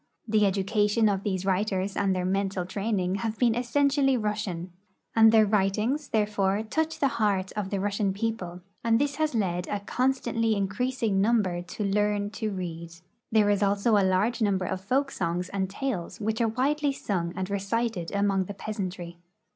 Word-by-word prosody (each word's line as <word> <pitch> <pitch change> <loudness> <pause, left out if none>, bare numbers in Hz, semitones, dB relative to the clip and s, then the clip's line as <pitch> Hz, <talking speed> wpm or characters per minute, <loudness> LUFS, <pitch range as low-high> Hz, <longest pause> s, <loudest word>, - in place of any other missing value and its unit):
The 210 -1 +3
education 205 +3 +2
of 195 -2 +1
these 190 -2 -2
Avriters 195 0 0
and 195 -2 +1
their 180 -1 -1
mental 195 -1 -1
training 195 -1 -1
have 225 0 -2
been 240 -3 +3
essentially 270 +3 +2
Russian, 210 -5 -3 0.4
and 225 -1 +7
their 220 -1 +6
Avritings, 210 +8 0
therefore, 205 -1 +1
touch 320 +8 -1
the 280 - +2
heart 195 -3 +1
of 210 -3 -3
the 200 - -1
Russian 200 0 0
people, 195 -4 -3 0.2
and 230 -1 +3
this 280 0 0
has 310 -4 0
led 180 -4 -1
a 205 - -2
constantly 235 -1 0
increasing 210 +1 0
number 200 -5 +2
to 180 +4 -6
learn 205 0 0
to 215 +1 -3
read 170 -3 -6 0.4
There 215 -2 +4
is 205 0 +1
also 200 +3 +2
a 200 - +4
large 190 +6 +1
number 195 -3 +1
of 185 - -3
folk 270 +8 0
songs 175 +1 -2
and 190 -1 -2
tales 205 -4 -3
Avhich 220 +2 -2
are 230 - +3
Avidely 280 +4 0
sung 175 -8 -2
and 190 0 -2
recited 200 -2 -1
among 200 -2 +1
the 205 - -7
jAeasantry. 185 -5 -5
205 Hz, 170 wpm, -27 LUFS, 190-225 Hz, 0.4 s, and